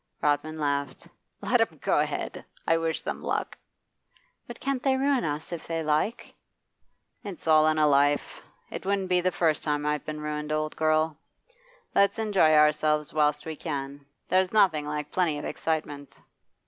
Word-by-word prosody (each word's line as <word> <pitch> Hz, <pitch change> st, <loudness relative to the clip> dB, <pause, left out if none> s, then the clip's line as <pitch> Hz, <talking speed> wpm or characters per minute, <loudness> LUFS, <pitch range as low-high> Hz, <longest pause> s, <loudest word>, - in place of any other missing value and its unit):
Rodman 150 Hz, +2 st, 0 dB
laughed. 140 Hz, -2 st, -2 dB, 0.3 s
'Let -, -, +2 dB
'em -, -, 0 dB
go -, -, +1 dB
ahead! -, -, -3 dB, 0.2 s
I 165 Hz, -, +3 dB
wish 165 Hz, -1 st, -2 dB
them -, -, -5 dB
luck.' -, -, -2 dB, 0.9 s
'But -, -, -9 dB
can't 275 Hz, -2 st, -2 dB
they 265 Hz, 0 st, +2 dB
ruin 275 Hz, -3 st, +1 dB
us 150 Hz, +1 st, -3 dB
if 170 Hz, -, -6 dB
they 165 Hz, -1 st, -2 dB
like?' 155 Hz, +10 st, -1 dB, 0.9 s
'It's 200 Hz, -4 st, -8 dB
all 155 Hz, -1 st, +5 dB
in 155 Hz, 0 st, +2 dB
a 155 Hz, -, +4 dB
life. 145 Hz, 0 st, +2 dB, 0.3 s
It -, -, -6 dB
wouldn't 195 Hz, -1 st, -1 dB
be 180 Hz, -1 st, +3 dB
the 185 Hz, +1 st, +1 dB
first 160 Hz, -3 st, +1 dB
time 150 Hz, -1 st, -1 dB
I've 150 Hz, -1 st, -1 dB
been 155 Hz, 0 st, -5 dB
ruined, 150 Hz, 0 st, -4 dB
old 155 Hz, 0 st, -1 dB
girl. 155 Hz, 0 st, +1 dB, 0.7 s
Let's 200 Hz, +2 st, +3 dB
enjoy 205 Hz, -8 st, +3 dB
ourselves 150 Hz, 0 st, +3 dB
whilst 150 Hz, -1 st, +1 dB
we 160 Hz, -1 st, -5 dB
can. 140 Hz, -3 st, -6 dB, 0.2 s
There's 185 Hz, 0 st, +2 dB
nothing 165 Hz, -9 st, +3 dB
like 150 Hz, 0 st, -4 dB
plenty 170 Hz, -5 st, +1 dB
of 145 Hz, -, -6 dB
excitement. 150 Hz, -3 st, -4 dB
155 Hz, 165 wpm, -27 LUFS, 150-175 Hz, 0.9 s, all